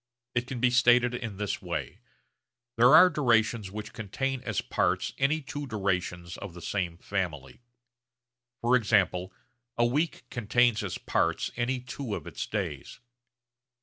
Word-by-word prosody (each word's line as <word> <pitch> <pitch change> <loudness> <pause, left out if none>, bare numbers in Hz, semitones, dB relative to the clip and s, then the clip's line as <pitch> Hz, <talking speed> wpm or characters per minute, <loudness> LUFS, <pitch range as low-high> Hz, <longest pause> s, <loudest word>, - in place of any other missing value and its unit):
It 120 0 -1
can 130 -2 -5
be 125 +1 +3
stated 120 0 +4
in 115 -5 -5
this 105 -1 -3
way: - - -4 0.8
There 120 +6 +7
are 180 +3 +9
durations 115 - +2
which 105 +2 -7
contain 130 +5 -3
as 110 -6 -2
parts 95 +5 0
any 145 +4 +2
two 145 0 -6
durations 90 -5 -2
of 95 -4 -8
the - - -8
same 90 -5 -2
family. 90 - -4 1.0
For 120 +2 +4
example 100 -5 +2 0.5
a 120 - +4
week 145 +7 0
contains 120 -1 +2
as 95 - -3
parts 85 0 0
any 125 +1 -1
two 125 -3 -5
of - - -7
its - - -5
days. - - -4
115 Hz, 145 wpm, -28 LUFS, 95-125 Hz, 1.0 s, are